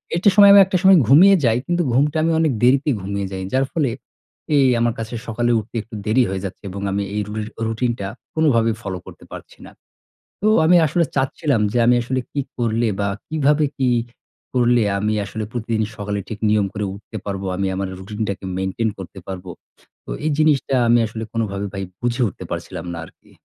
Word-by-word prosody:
এটি 180 +5 +4
সময়, 200 -1 +8
আমি 200 - +9
একটা 185 0 0
সময় 190 -1 +7
ঘুমিয়ে 185 - +7
যাই 115 -1 +3
কিন্তু 175 0 +1
ঘুমটা 145 +4 +2
আমি 165 - +2
অনেক 160 -2 +2
দেরিতে 130 +4 +4
ঘুমিয়ে 100 +1 -3
যাই। 95 0 -5
যার 135 +1 +2
ফলে 150 -6 0 0.7
এই 140 - +5
আমার 115 -1 +1
কাছে 115 +2 -5
সকালে 120 +1 0
উঠতে 110 +3 -11
একটু 110 +1 -12
দেরি 115 +4 +3
হয়ে 95 -1 -3
যাচ্ছে 95 - -8
এবং 100 +1 -6
আমি 100 +1 -1
এই 105 - 0
রু 105 - -7 0.3
রুটিন 115 +2 0
টা 95 - -3 0.3
কোনভাবেই 115 -8 +2
ফলো 95 -4 -4
করতে - - -13
পারছি - - -11
না। - - -12 0.7
তো 215 - +2 0.2
আমি 175 +3 +6
আসলে 170 +4 +1
চাচ্ছিলাম 135 -1 0
যে 120 - +1
আমি 125 - +5
আসলে 130 +2 -2
কী 145 - -1 0.2
করলে? 115 -1 0
বা 100 - 0 0.2
কিভাবে 150 -1 +2
কি 130 -2 +2 0.6
করলে? 120 -1 +3 0.2
আমি 105 +2 0
আসলে 110 +2 -5
প্রতিদিন 115 -2 -1
সকালে 100 0 -3
ঠিক 110 - -6
নিয়ম 105 -2 +2
করে 105 -1 -3
উঠতে 100 - -10
পারব। 100 -1 -3
আমি 100 - -1
আমার 95 0 -3
রুটিনটাকে 100 0 -5
মেইনটেইন 95 +4 -1
করতে 95 0 -9
পারব। 95 -1 -6 0.6
তো - - -10
এই 155 - +1
জিনিসটা 150 -3 +2
আমি 120 +1 +5
আসলে 110 +1 -6
কোনভাবেই 100 -3 -2
ভাই 95 - -3 0.2
বুঝে 120 +1 -1
উঠতে - - -10
পারছিলাম 85 - -5
না - - -6
আরকি। - - -19
115 Hz, 195 wpm, -20 LUFS, 100-140 Hz, 0.7 s, আমি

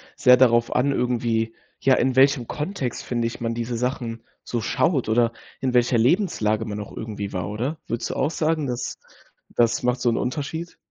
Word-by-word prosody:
sehr 125 0 +6
darauf 120 -2 +4
an 140 +2 +2
irgendwie, 115 -3 0 0.3
ja, 135 -1 +5
in 130 0 +1
welchem 135 -2 +4
Kontext, 150 - -3
finde 120 -2 -1
ich, 115 - -7
man 115 0 -1
diese 120 +1 -3
Sachen 120 -2 -3 0.2
so 120 - -2
schaut 135 - +1
oder 115 +1 +3 0.3
in 130 -2 -1
welcher 125 0 +3
Lebenslage 115 - +2
man 105 -2 -5
auch 105 - -8
irgendwie 105 -3 -5
war, 90 0 -3
oder? 125 +9 -3
Würdest 115 +1 -3
du - - -4
auch 155 - +1
sagen, 155 -2 0
das 125 0 -3 0.5
das 120 0 +1
macht 125 0 +1
so 125 - -1
'n 115 - +1
Unterschied? 155 +6 -3
120 Hz, 185 wpm, -24 LUFS, 115-135 Hz, 0.5 s, sehr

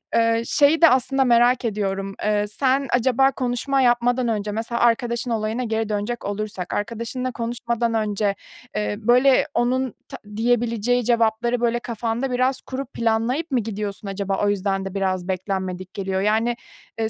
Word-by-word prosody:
eee 230 0 +3
şeyi 295 +6 +3
de 330 - +9
aslında 265 +1 +2
merak 240 0 +4
ediyorum, 195 -2 -2
eee, 210 0 +1
sen 265 +4 0
acaba 260 +2 +3
konuşma 265 +1 -1
yapmadan 245 0 +2
önce, 210 -2 -1
mesela 230 +2 -3
arkadaşın 235 0 +1
olayına 220 +2 -1
geri 220 -2 -2
dönecek 210 +3 -3
olursak, 205 -3 -4
arkadaşınla 235 +4 -3
konuşmadan 235 0 -2
önce, 210 -2 0 0.4
eee, 105 -1 -1
böyle, 250 +3 +4
onun 255 +1 0 0.2
ta - - -7 0.2
diyebileceği 240 +1 +1
cevapları, 235 0 +1
böyle, 240 0 +1
kafanda 235 +3 -3
biraz 255 +1 +1
kurup 270 +1 -6
planlayıp 235 +8 0
mı 255 - +2
gidiyorsun 210 -1 -5
acaba, 195 0 -1
o 205 - +3
yüzden 195 -1 -1
de 195 - -5
biraz 185 -2 -1
beklenmedik 185 -1 -3
geliyor? 190 -1 -2
Yani, 220 +4 +1 0.4
eee, 220 0 0
230 Hz, 150 wpm, -22 LUFS, 205-245 Hz, 0.4 s, de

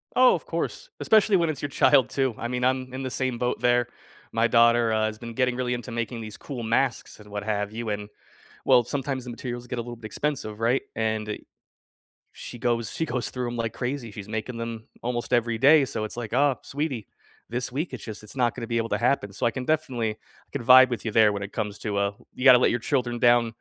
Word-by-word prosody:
Oh, 255 0 +7
of - - -6
course. - - -4
Especially 215 -2 +4
when 170 -2 +1
it's 155 - -3
your 145 - -2
child, 135 -1 +4
too. 135 -4 0
I 120 - -3
mean, 125 +1 -2
I'm 130 0 0
in 135 +1 -4
the 130 - -2
same 130 -2 -1
boat 125 0 -1
there. 120 0 +3 0.4
My 115 +1 +2
daughter, 120 -1 +4
uh, 110 0 +2
has 110 0 -3
been 115 +1 -8
getting 125 0 +1
really 125 -1 -1
into 120 0 -5
making 115 0 -3
these 110 -1 -8
cool 130 -5 -6
masks 115 +2 0
and 105 0 -14
what 105 0 -4
have 105 -1 -1
you, 115 0 -4
and, 105 0 -4 0.6
well, 120 - +6
sometimes 135 0 -3
the 125 - -8
materials 120 0 -6
get 125 - -4
a - - 0
little 120 +1 -7
bit 115 -1 -13
expensive, 110 -3 -3
right? 120 +4 +2
And 110 -1 -1
eh 105 - -3 0.9
she 120 - -9
goes 115 -2 0
she 160 - -1
goes 125 - -2
through 125 -1 -3
'em 120 - -5
like 115 -1 -2
crazy, 125 -3 -4
she's 105 -1 -9
making 110 +2 -4
them 115 -1 -6
almost 120 +1 -3
every 120 -1 +2
day, 140 +4 +6
so 115 -4 -3
it's 110 - -5
like, 120 -3 -5
"Oh, 140 -2 +3
sweetie, 140 -6 -4 0.4
this 125 +1 -3
week, 150 +7 -3
it's 130 -6 -7
just 110 -1 -7
it's 105 - -13
not 120 -3 +2
gonna 115 - -5
be 115 0 -1
able 115 0 -1
to - - 0
happen." 120 -5 +1
So 120 - 0
I - - +1
can 130 0 -5
definitely 130 -8 0
I 105 - -18
can 140 -4 -4
vibe 130 +1 +8
with 120 - -3
you 110 - -1
there 110 -2 +5
when 100 - -4
it 100 0 -6
comes 105 -2 -3
to, 105 -2 -3
uh, 100 0 +1 0.2
you 125 - -4
gotta 125 -2 +9
let - - +4
your 120 - 0
children 120 -1 -1
down 120 0 +4
120 Hz, 245 wpm, -26 LUFS, 110-130 Hz, 0.9 s, gotta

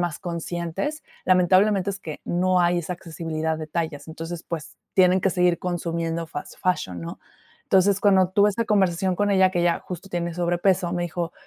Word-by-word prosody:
más 175 -3 -2
conscientes. 175 - -4 0.2
Lamentablemente, 185 +2 +4
es 195 - -5
que 155 -5 -8
no 180 +1 +2
hay 175 0 +3
esa 175 +2 -3
accesibilidad 160 -2 -3
de 155 - -5
tallas. 160 -2 -4
Entonces, 165 +1 -6
pues 160 -4 -6 0.2
tienen 185 0 +5
que 195 - +3
seguir 180 -1 +2
consumiendo 170 -2 -2
fast 145 -2 -8
fashion, 135 - -1
¿no? 85 0 -7 0.5
Entonces, 195 +1 +3
cuando 190 -3 +4
tuve 200 +2 +4
esa 230 +3 -1
conversación 190 -3 +2
con 205 0 +1
ella 190 -1 +4
que 175 -2 0
ella 170 -1 +2
justo 180 +2 -8
tiene 170 -1 -2
sobrepeso, 175 0 +1
me 175 -1 -1
dijo: 170 0 -3
175 Hz, 180 wpm, -24 LUFS, 165-190 Hz, 0.5 s, tienen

